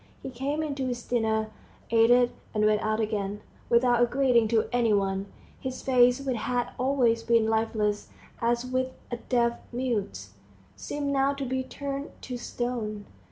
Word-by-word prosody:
He 265 - -5
came 280 +5 -2
in 300 -2 -2
to 270 -2 -2
his 240 -2 -3
dinner, 220 -2 0 0.4
ate 230 0 +5
it, 245 0 +5 0.2
and 210 0 +3
went 215 0 +3
out 215 0 0
again, 210 -2 -2 0.3
without 240 0 +4
a 240 - +5
greeting 250 -3 +3
to 220 0 +2
any 240 -3 +2
one. 195 -1 0 0.3
His 260 -1 -5
face, 250 -1 +4
which 265 -3 -2
had 245 +2 -1
always 250 -3 +2
been 230 -1 +3
lifeless, 220 -2 0 0.3
as 235 +1 +1
with 255 0 -1 0.2
all 240 - -3
deaf 235 -1 +2
mutes, 205 - -3 0.4
seemed 280 - -3
now 275 +1 +2
to 275 -1 -4
be 260 +1 -1
turned 280 +2 -5
to 250 - -5
stone. 235 -4 -4
240 Hz, 165 wpm, -27 LUFS, 220-255 Hz, 0.4 s, ate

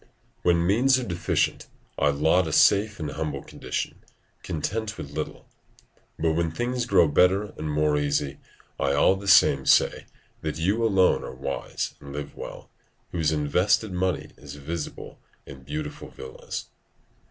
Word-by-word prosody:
["When 85 -1 +3
means 125 +8 +4
are 130 - -2
deficient, 85 -6 -1 0.3
I 75 - +4
laud 80 +5 +2
a - - -3
safe 100 +5 +4
and 75 -2 -3
humble 75 -3 -4
condition, - - -5 0.4
content 110 +8 -3
with 70 - -7
little: 75 +1 -5 0.7
but 80 0 +1
when 85 +1 0
things 120 +7 -2
grow 90 -7 +5
better 95 +7 +3
and 75 - -4
more 75 0 +2
easy, 70 -1 -1 0.4
I 70 0 +1
all 70 +6 +4
the 100 +1 -8
same 70 -7 +5
say - - +3 0.3
that 80 -1 -3
you 100 +8 +1
alone 95 -5 +3
are - - -7
wise 70 +1 -4
and 70 0 -10
live 75 -1 -6
well, - - -9 0.4
whose 80 -3 +1
invested 90 +7 +1
money 90 0 -1
is 70 0 -10
visible 75 +2 -6 0.3
in 70 -1 -11
beautiful 75 +3 -6
villas." 65 - -7
80 Hz, 150 wpm, -25 LUFS, 75-95 Hz, 0.7 s, grow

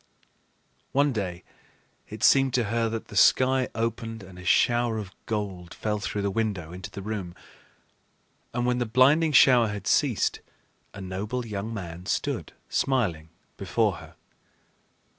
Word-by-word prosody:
One 140 0 +3
day 90 -5 -4 0.7
it - - -7
seemed 135 -1 +5
to 125 - +2
her 115 -1 +1
that 115 0 -5
the - - -10
sky 130 +5 +4
opened 115 -1 -3
and 90 -1 -12
a - - -10
shower 120 +4 +2
of 100 -4 -6 0.2
gold 95 -6 -4
fell 105 -1 -2
through 105 0 -3
the 100 - 0
window 95 -6 -2
into 90 0 -7
the 100 - -8
room; 100 -5 -5 1.2
and 120 0 -1
when 125 0 +1
the 120 - -1
blinding 140 +7 +4
shower 125 -4 +6
had 105 -2 -5
ceased, 130 -4 +1 0.6
a 100 - -8
noble 105 +7 -4
young 105 0 -4
man 90 -4 -7
stood - - -2 0.2
smiling 90 - 0 0.3
before 100 0 0
her. - - -13
110 Hz, 145 wpm, -26 LUFS, 95-120 Hz, 1.2 s, shower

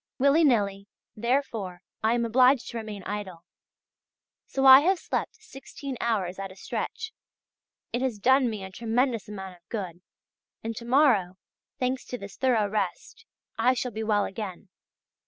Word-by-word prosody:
Willy 280 +5 +4
nilly, 200 -7 +2 0.3
therefore, 220 -6 -2 0.2
I 225 +2 +3
am 235 -1 0
obliged 255 +2 +4
to 235 - -5
remain 215 -3 -6
idle. 190 -4 -6 1.0
So 270 0 -1
I 265 0 +11
have 365 +6 +2
slept - - -3
sixteen 280 -9 -9
hours 195 -6 -1
at 195 -1 -5
a - - -13
stretch; 445 - -5 0.8
it 240 - 0
has 260 -5 -1
done 260 +4 +4
me 215 -3 -5
a 190 - -8
tremendous 230 +1 0
amount 190 -3 -7
of 175 - -37
good, 185 -6 -5 0.6
and 225 0 -4
to 235 - -7
morrow, 235 -9 +3 0.4
thanks 255 0 -1
to 250 - -5
this 200 -3 -10
thorough 240 -6 +2
rest, 210 - -3 0.3
I 255 +1 +4
shall 250 0 -2
be 220 0 -5
well 210 -2 +2
again. 195 -1 -6
225 Hz, 155 wpm, -27 LUFS, 200-260 Hz, 1.0 s, I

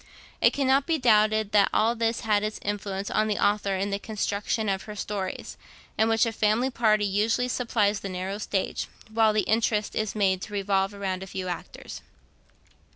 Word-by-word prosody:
It - - +6
cannot 270 0 +2
be 330 -2 +2
doubted 215 -4 +3
that 205 -2 +4
all 225 +2 +2
this 230 0 -1
had 210 -3 +2
its 215 0 -3
influence 200 -1 -3
on 215 0 +2
the 210 - -1
author 205 -1 +1
in 195 +2 -2
the 200 - -1
construction 210 +1 -2
of 195 -1 -1
her 210 -1 -8
stories, 200 -2 -5 0.4
in 220 +1 +2
which 225 +1 +3
a 230 - -1
family 225 +4 +1
party 215 -3 +2
usually 215 +5 +1
supplies 225 -5 0
the 195 - -6
narrow 190 +2 -4
stage, 200 -2 -2 0.2
while 220 -1 +4
the 215 0 +2
interest 220 -1 0
is 215 -1 -2
made 190 -3 +1
to 210 - -8
revolve 195 0 0
round 190 -2 -3
a 190 - -7
few 190 -1 -5
actors. 175 - -7
210 Hz, 185 wpm, -26 LUFS, 200-220 Hz, 0.4 s, It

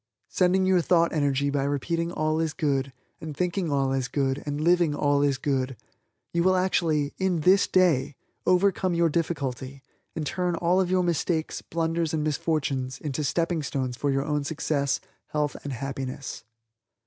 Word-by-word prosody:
Sending 185 +1 +2
your 185 -1 +4
thought 170 0 +3
energy 140 -2 +1
by 140 -1 0
repeating 165 +4 -1
All 155 -1 0
is 160 -2 -1
Good, 140 -5 0 0.3
and 155 -3 -7
thinking 180 -2 -1
All 135 -1 +1
is 130 -2 -1
Good, 135 +2 -1
and 145 0 -2
living 170 -1 +3
All 145 -1 +2
is 140 -2 +2
Good, 130 -2 -1 0.6
you 170 - +2
will 185 +2 +4
actually, 165 -6 +1
in 185 -4 +1
this 190 +5 +5
day, 160 -8 +2 0.3
overcome 185 -1 +3
your 170 0 +3
difficulty, 140 -5 -3 0.3
and 155 - -3
turn 180 +2 -1
all 175 +3 +2
of 180 - -1
your 185 0 +2
mistakes, 170 -1 -1
blunders 165 0 -1
and 155 - -1
misfortunes 140 -4 -1
into 150 0 -3
stepping 165 +3 0
stones 130 -3 -3
for 145 +3 -1
your 135 0 0
own 150 -1 -1
success, 140 -2 -1 0.3
health 150 -1 -1
and 145 - -4
happiness. 135 0 -5
155 Hz, 165 wpm, -26 LUFS, 140-170 Hz, 0.6 s, this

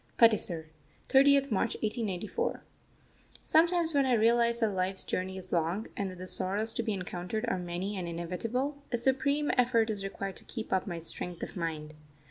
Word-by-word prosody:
PATISAR, 195 -8 +4 0.4
30th 275 0 +5
March 220 +3 +1
1894. 215 - -2 0.8
Sometimes 335 0 +4
when 280 -2 +3
I 255 - +3
realise 235 +1 +4
that 220 -2 +3
Life's 190 0 -1
journey 190 +1 -3
is 185 -1 -7
long, 170 +5 0
and 200 -1 -2
that 185 - -9
the 185 - -7
sorrows 205 +4 0
to - - -1
be 225 -1 -2
encountered 185 +3 -3
are 230 - 0
many 180 +3 -3
and 180 -3 -4
inevitable, 230 - -3
a 240 - +1
supreme 280 +4 +1
effort 235 -2 +3
is 200 -2 -4
required 195 0 -5
to - - -13
keep 225 -5 -5
up 190 +1 +1
my 175 -3 -3
strength 170 +1 -4
of - - -6
mind. 155 -3 -4
210 Hz, 175 wpm, -30 LUFS, 180-240 Hz, 0.8 s, 30th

